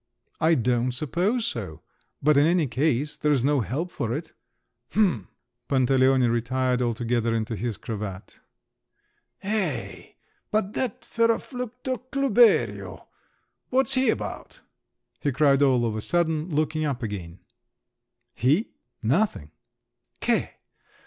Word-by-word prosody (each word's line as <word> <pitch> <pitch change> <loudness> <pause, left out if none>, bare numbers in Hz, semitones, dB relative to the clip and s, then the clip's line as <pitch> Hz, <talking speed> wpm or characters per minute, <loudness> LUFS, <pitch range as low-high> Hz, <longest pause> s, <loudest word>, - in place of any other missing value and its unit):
"I 165 0 +4
don't 125 0 +1
suppose 180 - 0
so; 95 - -5 0.4
but 150 +1 +5
in 145 +2 +5
any 170 -2 +3
case, 145 +2 0
there's 145 -4 +1
no 145 0 +3
help 135 - -3
for 115 - -3
it." 160 +3 -6 0.6
"H'm!" 175 - +1 0.4
Pantaleone 130 -1 +3
retired 125 +2 0
altogether 120 -1 0
into 110 0 -2
his 115 -1 -3
cravat. 105 -3 -7 1.0
"Hey, 210 +1 -3 0.3
but 210 -1 0
that 250 -5 -2
ferroflucto 245 +2 -1
Klüberio—what's 265 +1 +1
he 260 0 +3
about?" - - -4 0.6
he 145 - 0
cried 140 +1 +3
all 130 -4 +4
of 110 -2 -1
a 110 - -3
sudden, 160 +2 0
looking 155 0 0
up 135 -5 -2
again. 95 -5 -5 1.0
"He? 145 - +1 0.3
Nothing." 125 - 0
140 Hz, 110 wpm, -25 LUFS, 120-180 Hz, 1.0 s, but